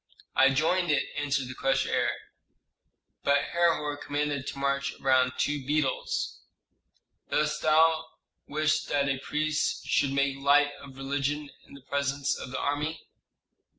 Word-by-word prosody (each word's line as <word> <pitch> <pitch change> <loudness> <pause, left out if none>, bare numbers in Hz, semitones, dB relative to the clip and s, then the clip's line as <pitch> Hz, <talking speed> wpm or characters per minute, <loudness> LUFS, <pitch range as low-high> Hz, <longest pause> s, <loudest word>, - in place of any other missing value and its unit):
"I 135 - +6
joined 165 +6 +1
it," 145 -2 +2
answered 140 -2 -1
the 130 - -6
crushed 135 +1 +1
heir; - - +1 1.1
"but 140 0 +3
Herhor 165 -4 +2
commanded 145 -1 -2
to - - -5
march 140 0 -1
around 130 -1 +3
two 145 -1 0
beetles." 145 0 -1 0.9
"Dost 150 0 0
thou 160 +1 +4 0.4
wish 155 +1 +1
that 140 -1 0
a 135 -1 0
priest 155 +2 -1
should 140 - +2
make 140 0 +1
light 145 +1 +4
of 135 -1 -12
religion 140 +2 -2 0.2
in - - -14
the 140 - -13
presence 140 +1 -1
of - - -7
the 130 - -4
army?" 150 +3 -2
145 Hz, 140 wpm, -28 LUFS, 135-150 Hz, 1.1 s, I